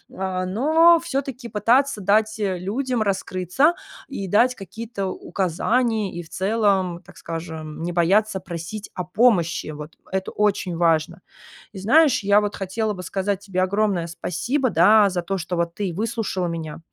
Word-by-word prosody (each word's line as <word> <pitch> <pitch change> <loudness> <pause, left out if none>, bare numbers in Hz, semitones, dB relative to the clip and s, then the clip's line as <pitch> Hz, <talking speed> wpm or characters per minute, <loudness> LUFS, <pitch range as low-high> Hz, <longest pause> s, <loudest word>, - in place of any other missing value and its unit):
а, 185 -1 -2
но 320 - +4
всё-таки 270 -6 -4
пытаться 230 +4 +2
дать, 215 +3 +2
э, 195 -3 -1
людям 245 +6 -2
раскрыться 195 - +1 0.3
и 200 -9 -5
дать 245 +5 +3
какие-то 200 +1 -6
указания, 210 +4 -1
и 175 0 -6
в 160 - -18
целом, 195 -3 0
так - - -17
скажем, 160 -1 -6
не 175 - -2
бояться 190 +4 +2
просить 180 +3 -7
о 180 - -4
помощи. 180 -4 +2
Вот, 150 +1 -8 0.2
э, 190 - +1
это 190 - -5
очень 200 -4 0
важно. 165 +1 +1 0.5
И - - -9
знаешь, 280 +3 +4
я 205 +1 +5
вот 205 0 -3
хотела 210 +3 -2
бы 180 - -8
сказать 195 +2 -2
тебе 185 -2 -2
огромное 195 -3 0
спасибо, 230 - -1
да, 205 +5 +6
а, - - +3
за 180 -1 -2
то, 195 +2 -2
что 175 +1 -4
вот 170 0 -1
ты 195 -5 -3
выслушала 215 -3 -2
меня. 165 -2 -5
195 Hz, 165 wpm, -22 LUFS, 175-220 Hz, 0.5 s, да